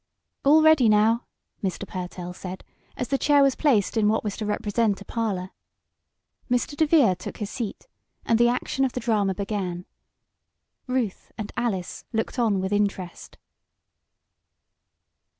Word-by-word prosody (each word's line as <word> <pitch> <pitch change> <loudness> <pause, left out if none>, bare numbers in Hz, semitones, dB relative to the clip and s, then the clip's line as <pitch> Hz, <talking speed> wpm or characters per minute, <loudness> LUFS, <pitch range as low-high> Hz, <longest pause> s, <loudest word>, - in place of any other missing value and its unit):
"All 305 +3 +6
ready, 315 -7 +6
now!" 220 +3 +3 0.4
Mr. 190 +1 -3
Pertell 180 -1 -6
said, 185 +1 -8 0.3
as 250 - -3
the 275 - +1
chair 290 -1 +5
was 275 -1 +4
placed 240 -11 +2
in 215 -1 +3
what 220 - +1
was 210 -2 -3
to 215 - -3
represent 210 0 0
a 200 - -11
parlor. 195 -6 -2 1.0
Mr. 245 +4 0
DeVere 295 - +4
took 180 - -8
his 210 -2 -5
seat, 230 -5 -5 0.4
and 230 -1 +2
the 240 - +6
action 250 +2 -1
of 260 - 0
the - - -2
drama 210 -5 +1
began. 190 -3 -3 1.0
Ruth 250 -6 -2
and 210 -1 -5
Alice 195 -7 -2
looked 225 +3 -2
on 215 -5 +2
with 190 +2 -2
interest. 200 -3 -2
215 Hz, 145 wpm, -25 LUFS, 195-245 Hz, 1.0 s, All